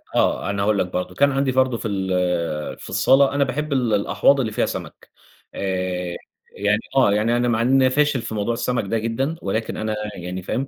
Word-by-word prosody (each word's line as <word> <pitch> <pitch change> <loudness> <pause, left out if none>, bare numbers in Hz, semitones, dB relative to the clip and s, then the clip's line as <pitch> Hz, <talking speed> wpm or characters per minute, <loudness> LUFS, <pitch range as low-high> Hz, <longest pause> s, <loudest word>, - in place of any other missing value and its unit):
آه، - - +1
أنا 100 0 -1
هاقول 105 0 +2
لك - - +2
برضو، 90 0 -4
كان 140 +4 +3
عندي 135 0 +1
برضو 130 -2 +2
في 115 - -4
ال 90 -5 -1
في - - -10
الصالة، 135 +9 +4
أنا 145 0 +2
باحب 150 +2 -2
ال 125 -4 +1
الأحواض 105 +7 +3
اللي 115 -5 -1
فيها - - 0
سَمَك، - - -7 0.5
آآ 90 -2 -2 0.4
يعني 105 +1 +2 0.2
آه، 130 -7 +5
يعني 115 +3 +2
أنا 120 0 +1
مع 115 -1 +1
إنّي 130 +2 +4
أنا - - +4
فاشل 150 -3 +2
في 110 - -6
موضوع 105 +3 -1
السَمَك 120 +1 -1
ده 115 +4 -1
جدًا، 130 +8 -2
ولكن 110 +3 -2
أنا 110 0 -2 0.2
يعني 90 +1 -6
فاهم؟ 130 +9 -3
110 Hz, 210 wpm, -22 LUFS, 95-130 Hz, 0.5 s, آه